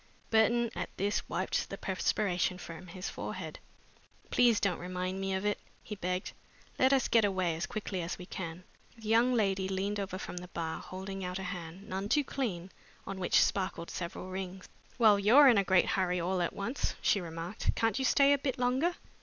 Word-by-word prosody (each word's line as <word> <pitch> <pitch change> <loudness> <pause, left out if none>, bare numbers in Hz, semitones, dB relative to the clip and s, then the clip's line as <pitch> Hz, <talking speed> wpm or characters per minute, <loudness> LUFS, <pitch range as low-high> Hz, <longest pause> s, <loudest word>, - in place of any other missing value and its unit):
Burton, 225 +1 +3
at - - -4
this, 205 +2 -1
wiped 185 +2 -1
the 195 - -5
perspiration 185 -1 0
from 175 0 -9
his 180 +2 -6
forehead. - - -6 0.7
"Please 240 -3 +5
don't 195 -4 0
remind 185 +1 -3
me 195 0 -1
of 190 +2 -2
it," 210 - +1 0.2
he - - -6
begged. 185 -2 -2 0.5
"Let 260 +1 +5
us 270 -2 +3
get 230 -2 +4
away 185 -4 +1
as 165 - -3
quickly 200 -3 -3
as 170 +1 -4
we 180 - -9
can." 175 -1 -6 0.3
The 220 -1 -9
young 230 +3 +5
lady 195 -4 +1
leaned 195 +2 -1
over 190 -2 -3
from 185 - -7
the 180 0 -6
bar, 165 -2 -4
holding 190 +1 -6
out 180 0 -3
a 190 - -5
hand, 180 0 -6
none 195 +2 -3
too 295 +4 +3
clean, 195 -10 -3 0.3
on 195 - -5
which 180 - +4
sparkled 185 -3 -2
several 180 +1 -5
rings. 190 0 -6 0.3
"Well, 215 -4 +6
you're 245 +9 +7
in 235 -6 +6
a - - +3
great 190 -1 +4
hurry 180 -1 +1
all 180 +2 0
at 175 - -1
once," 235 +8 -2
she 200 - +3
remarked. 170 +4 -3
"Can't 225 +3 +1
you 265 - 0
stay 280 +2 +5
a 285 - +1
bit 265 -1 -2
longer?" 260 +8 +1
190 Hz, 195 wpm, -31 LUFS, 180-220 Hz, 0.7 s, you're